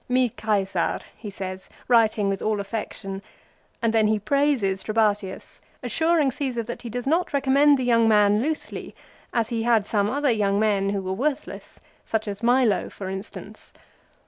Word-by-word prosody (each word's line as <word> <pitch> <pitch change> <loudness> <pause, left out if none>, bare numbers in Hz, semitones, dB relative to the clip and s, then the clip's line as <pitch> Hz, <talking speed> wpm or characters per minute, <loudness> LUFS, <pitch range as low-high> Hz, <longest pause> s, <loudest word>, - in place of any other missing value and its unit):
" - - -40
Mi 250 -2 +2
Caesar," 195 -5 0 0.2
he 215 - -8
says, 190 -1 -7 0.2
writing 220 -4 +3
with 195 -1 -1
all 215 -1 0
affection; 200 -1 -5 0.6
and 230 -1 +2
then 220 -1 +4
he 215 0 +2
praises 235 -5 +1
Tlebatius, 210 -3 -1 0.2
assuring 320 -4 +2
Caesar 250 -3 -3
that 240 +2 -7
he 240 - -7
does 245 +2 -4
not 330 +5 +1
recommend 280 +1 +4
the 260 - -2
young 230 -2 +3
man 210 -1 +4
loosely, 310 +4 -4 0.4
as 230 -2 0
he 230 -1 -2
had 225 -3 +2
some 205 -1 +1
other 285 +2 +1
young 205 -3 +1
men 200 -2 +1
who 200 -1 -2
were 185 0 -2
worthless, 280 +7 -4 0.2
such 220 -1 -2
as 200 0 -5
Milo, 240 -3 +2
for 190 -2 -7
instance. 195 +2 -9
220 Hz, 170 wpm, -24 LUFS, 200-255 Hz, 0.6 s, then